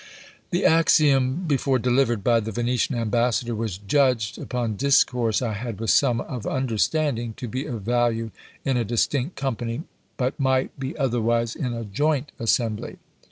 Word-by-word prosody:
"The 175 +2 0
Axiom 150 -2 +4
before 140 -3 +1
delivered 120 -3 +1
by 120 0 +4
the 110 0 -4
Venetian 120 +3 0
ambassador 120 +1 0
was 110 -4 -3
judged 110 0 +1
upon 120 -3 -2
discourse 125 -3 +2
I 115 -3 -1
had 110 -1 -5
with 115 -1 +1
some 125 -4 +3
of 125 -8 -6
understanding, 125 -1 0
to 125 - -6
be 130 +5 -4
of 115 -7 -5
value 115 -1 0 0.3
in 135 -2 +1
a 120 - +1
distinct 125 - 0
company, 120 0 -3 0.3
but 130 +2 -1
might 130 0 0
be 135 +3 -4
otherwise 120 -3 0
in 125 -4 -3
a 115 -1 -5
joint 145 +7 0
assembly!" 115 -1 -1
120 Hz, 155 wpm, -24 LUFS, 115-135 Hz, 0.3 s, Axiom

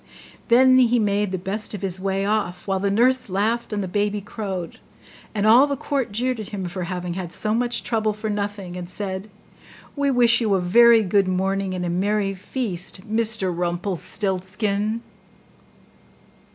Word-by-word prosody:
Then 255 +2 +6
he 245 -1 +4
made 205 -2 +1
the 185 - -1
best 205 +4 -4
of 200 - -8
his 190 -1 0
way 195 +1 -1
off, 200 -4 -1
while 195 -1 0
the 200 +1 0
nurse 250 +4 +2
laughed 220 +6 -1
and 205 -1 -1
the - - -3
baby 205 +2 0
crowed; 195 -4 -6 0.6
and 205 -1 0
all 240 +6 +7
the 285 - -1
court 270 -4 -2
jeered 245 +3 -1
at 215 - -5
him 195 -3 -5
for 180 0 -4
having 180 -1 -4
had 180 -2 -5
so 215 +3 -1
much 240 +1 -1
trouble 220 -2 0
for 210 +1 -5
nothing, 205 -3 -3
and 175 -1 -6
said, 190 +1 -5 0.7
'We 285 -1 +1
wish 240 -2 +4
you 210 -4 +2
a - - +2
very 230 +5 +6
good 195 0 +2
morning, 190 +1 -1
and 180 -1 -3
a - - -1
merry 200 +2 0
feast, 190 -2 -3
Mr 220 -5 0
RUMPLESTILTSKIN! 190 +4 -2
205 Hz, 170 wpm, -23 LUFS, 185-225 Hz, 0.7 s, all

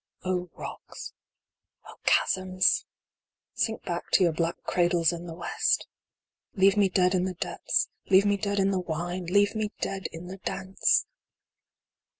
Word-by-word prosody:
O 180 -1 -1
Rocks! - - -8 0.7
O - - -12
Chasms! 185 0 +2 0.7
sink 220 -1 -1
back 175 -1 -4
to - - +6
your 170 -2 +3
black 165 +1 -1
cradles 175 -2 +2
in 170 +1 -7
the 165 - -7
West! 175 0 0 0.7
Leave 195 -1 +5
me 200 -2 +3
dead 180 0 +3
in 185 -1 +1
the 185 -1 -3
depths! - - -1 0.2
Leave 195 +1 +6
me 205 0 +3
dead 200 0 -2
in 195 0 +3
the 190 - 0
wine! 175 +1 -3
Leave 200 +3 +3
me 215 -1 -2
dead 195 -2 -3
in 165 +2 -9
the 185 +2 -8
dance 190 0 0
185 Hz, 155 wpm, -27 LUFS, 175-195 Hz, 0.7 s, to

